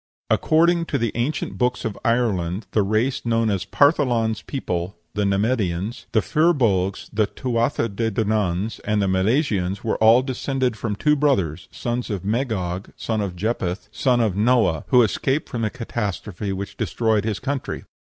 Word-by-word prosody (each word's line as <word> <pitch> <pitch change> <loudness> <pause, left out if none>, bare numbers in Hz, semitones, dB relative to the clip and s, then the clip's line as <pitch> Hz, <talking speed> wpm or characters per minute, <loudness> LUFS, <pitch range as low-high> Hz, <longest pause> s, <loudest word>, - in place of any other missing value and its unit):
According 170 +2 +3
to 145 - -1
the 115 -4 0
ancient 120 +7 -2
books 125 -1 0
of 110 -3 -2
Ireland 105 -5 0
the 110 - +3
race 110 +7 0
known 115 -2 +1
as 95 -2 -1
"Partholan's 125 -7 +2
people," 90 -8 -4 0.2
the 105 -1 0
Nemedians, 100 +1 -1
the 110 - +2
Fir 165 +3 +3
Bolgs, 100 - 0
the 110 -1 +2
Tuatha 120 +1 -1
de 115 +2 -1
Dananns, 105 -2 -1
and 105 0 0
the 100 - +2
Milesians 95 - +1
were 110 - 0
all 115 +3 +6
descended 130 -1 -1
from 105 0 -3
two 150 +7 +2
brothers, 95 - 0
sons 120 +1 -3
of 100 -3 -4
Magog, 105 -6 -2
son 110 -2 -2
of 95 -3 -3
Japheth, 95 -2 -2
son 125 -3 +2
of 105 -5 +1
Noah, 105 -7 +2
who 125 -1 +6
escaped 135 +7 0
from 120 - -4
the 110 - +1
catastrophe 105 -5 -4
which 95 +1 -5
destroyed 110 -3 +1
his 110 -2 -1
country. 140 0 -3
110 Hz, 160 wpm, -22 LUFS, 100-125 Hz, 0.2 s, all